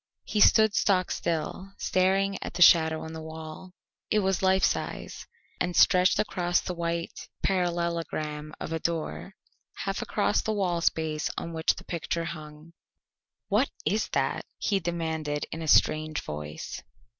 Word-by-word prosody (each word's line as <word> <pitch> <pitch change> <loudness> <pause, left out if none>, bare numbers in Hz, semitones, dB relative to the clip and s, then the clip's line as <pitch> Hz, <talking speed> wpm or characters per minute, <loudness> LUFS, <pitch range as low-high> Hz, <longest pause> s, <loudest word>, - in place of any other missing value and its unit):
He 210 - -2
stood 220 0 +6
stock 185 -4 +2
still 170 +4 -3
staring 195 +1 +1
at - - -6
the 175 - +6
shadow 160 -2 +6
on 160 - -7
the 160 - -6
wall. 160 +3 -9 0.4
It 215 - +2
was 190 -1 0
life 190 0 +3
size - - -2 0.3
and 180 -1 -1
stretched 180 +2 +5
across 175 -4 +1
the 180 - -4
white 170 -1 -4
parallelogram 170 -4 -1
of 165 - -4
a 160 - -1
door, 170 +4 -3 0.5
half - - -2
across - - +1
the 220 - -1
wall 180 -5 0
space 155 -2 0
on 170 - -4
which 160 0 +1
the - - -10
picture 170 0 -3
hung. 155 0 -9 0.7
"What 215 +7 +2 0.2
is 215 +2 0
that?" - - 0
he 200 -2 +1
demanded 160 -4 -2
in 165 - -5
a 160 - -4
strange 155 +1 +3
voice. 75 0 -6
170 Hz, 150 wpm, -28 LUFS, 160-185 Hz, 0.7 s, stood